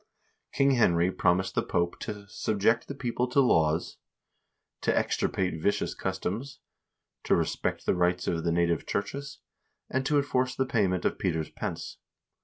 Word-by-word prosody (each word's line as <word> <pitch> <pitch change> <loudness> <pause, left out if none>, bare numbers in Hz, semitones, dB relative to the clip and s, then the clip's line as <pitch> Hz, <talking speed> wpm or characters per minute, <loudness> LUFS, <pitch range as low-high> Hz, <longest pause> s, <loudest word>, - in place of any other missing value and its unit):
King 140 0 +3
Henry 90 -8 +3
promised 95 +1 +1
the - - +2
Pope 85 0 -1
to 105 -2 -6
"subject 110 +3 +1
the 140 - -5
people 125 -1 -1
to 125 +3 +2
laws, 80 - +2 0.8
to - - +1
extirpate 90 -4 0
vicious 100 - 0
customs, 95 +8 -4 0.6
to - - +3
respect - - -1
the - - +3
rights 90 0 +1
of 85 -1 0
the 85 - +1
native 85 0 +1
churches, 135 +7 -4 0.5
and 130 +1 +1
to 150 - +3
enforce 130 -3 +1
the 130 - +1
payment 95 -7 +1
of - - 0
Peter's 80 -4 -1
Pence." - - -5
95 Hz, 150 wpm, -28 LUFS, 90-125 Hz, 0.8 s, King